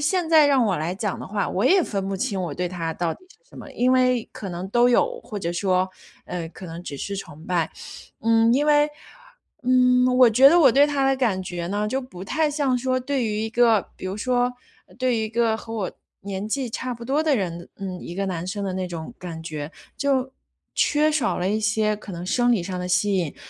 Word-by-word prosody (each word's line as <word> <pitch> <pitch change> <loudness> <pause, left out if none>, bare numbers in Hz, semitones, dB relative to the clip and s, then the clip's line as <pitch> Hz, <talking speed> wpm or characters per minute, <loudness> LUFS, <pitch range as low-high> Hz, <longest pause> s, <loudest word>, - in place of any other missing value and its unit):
现 355 0 +1
在 315 -2 +6
让 270 -4 +4
我 195 -4 +1
来 160 +3 -2
讲 200 0 -3
的 - - -6
话， 205 +1 -2
我 190 - -1
也 380 0 +5
分 195 -8 -3
不 195 - -2
清 190 0 -2
我 170 -4 -3
对 180 +2 -2
他 170 -2 -3
到 165 0 -2
底 - - -21
是 - - -24
什 - - -15
么。 - - -10
因 250 +1 +2
为 255 -2 +2
可 200 - -7
能 180 +1 -5
都 240 +2 +4
有， 485 - +2
或 210 - -6
者 170 -3 -3
说， 185 +1 +1 0.4
呃， 170 -2 -5
可 180 +3 -11
能 165 +1 -8
只 145 -5 -6
是 200 +8 -4
崇 160 -4 -9
拜。 170 -3 0 0.5
嗯， 225 +1 +4
因 285 +4 +2
为 295 0 +4 0.7
嗯， 250 0 +4
我 250 -2 +8
觉 255 +5 +6
得 340 +4 +5
我 275 -5 +7
对 280 +4 +5
他 280 -2 0
的 270 - +2
感 220 -8 0
觉 175 -2 -5
呢， 205 +2 -1
就 265 +5 -1
不 185 -8 -10
太 310 +8 0
像 285 -3 +1
说 255 +1 0
对 260 -1 -1
于 210 -1 -1
一 220 - -2
个 230 -3 +3
比 - - -7
如 190 +2 -4
说 245 +2 +1 0.5
对 255 -2 +1
于 220 - 0
一 - - -4
个 230 0 +1
和 225 0 -9
我 200 -4 -2 0.3
年 195 0 -5
纪 260 +2 -1
差 250 +2 -3
不 235 - -12
多 275 +5 +1
的 310 -2 +2
人 175 -4 -4
嗯， 185 -2 -6
一 170 - -7
个 195 +1 -2
男 180 -2 -3
生 200 +2 -4
的 190 - -2
那 185 -1 -2
种 165 -3 -7
感 165 -3 -7
觉， 155 -1 -6 0.2
就 265 -2 0 0.4
缺 300 +1 +3
少 300 -5 0
了 180 - 0
一 215 - +1
些 215 -1 +1
可 205 -2 -10
能 175 +1 -6
生 245 +5 +2
理 205 -7 +1
上 185 0 -4
的 180 - -3
吸 200 +2 +2
引。 170 -6 -1
215 Hz, 255 characters per minute, -23 LUFS, 185-255 Hz, 0.7 s, 我